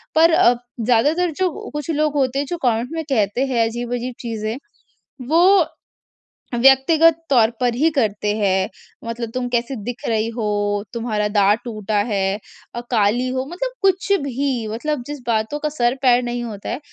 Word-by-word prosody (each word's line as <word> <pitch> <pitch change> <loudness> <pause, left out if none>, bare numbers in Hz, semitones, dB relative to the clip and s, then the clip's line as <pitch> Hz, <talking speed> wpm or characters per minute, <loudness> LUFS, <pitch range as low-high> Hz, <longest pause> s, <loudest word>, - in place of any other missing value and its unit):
पर 325 +1 +6
अ, 245 - +5 0.3
ज़्यादातर 295 +10 +2
जो 370 -4 -2
कुछ 295 +1 -5
लोग 305 -1 +1
होते 270 -1 +1
हैं 285 - -1
जो 350 - -2
कमेंट 240 0 +1
में 325 0 -3
कहते 230 0 +1
हैं 245 -4 +1
अजीब-अजीब 240 +1 -4
चीज़ें 225 -1 -4 0.7
वो 355 +4 +5 1.0
व्यक्तिगत 300 +5 +5
तौर 235 -5 +5
पर 245 -2 +1
ही 305 +6 +3
करते 210 -7 0
हैं 190 -2 +1 0.4
मतलब 230 0 -4
तुम 255 -1 -2
कैसे 240 +2 -1
दिख 245 +5 -6
रही? 220 -1 +1
हो 205 -3 -1
तुम्हारा 220 -3 -1
दाँत 205 +1 +3
टूटा 215 -3 -3
है 195 -1 0 0.4
अ, 240 - -3
काली 230 +2 +2
हो 260 +1 -2
मतलब - - -3
कुछ 390 +1 +1
भी, 265 -3 -2
मतलब 245 +5 -3
जिस 295 0 -6
बातों 225 +5 0
का 300 - -1
सर-पैर 250 -2 +2
नहीं 240 0 -3
होता 210 -4 -6
है 245 - -3
245 Hz, 165 wpm, -20 LUFS, 220-285 Hz, 1.0 s, पर